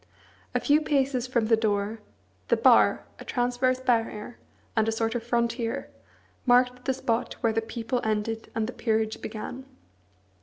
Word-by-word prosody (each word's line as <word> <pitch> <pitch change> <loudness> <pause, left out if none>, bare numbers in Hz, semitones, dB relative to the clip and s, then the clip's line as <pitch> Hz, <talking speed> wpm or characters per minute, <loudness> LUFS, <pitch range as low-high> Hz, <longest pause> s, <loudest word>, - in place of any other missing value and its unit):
A - - +4
few 295 +1 +3
paces 270 -4 +1
from 240 -3 +1
the 225 +1 +5
door, 215 0 -1 0.5
the - - +3
bar, - - +5 0.2
a - - -8
transverse 250 +1 0
barrier, 230 -2 -1 0.4
and 220 -1 +2
a - - +2
sort 225 0 -1
of 240 - -2
frontier, 235 0 -1 0.5
marked 250 0 +3
the 265 - +2
spot 230 -3 -1
where 230 -2 +2
the 225 - +1
people 230 +2 -3
ended 220 +1 -2
and 225 -1 0
the 245 - -5
peerage 220 -2 -1
began. 220 +4 -6
235 Hz, 155 wpm, -27 LUFS, 225-250 Hz, 0.5 s, the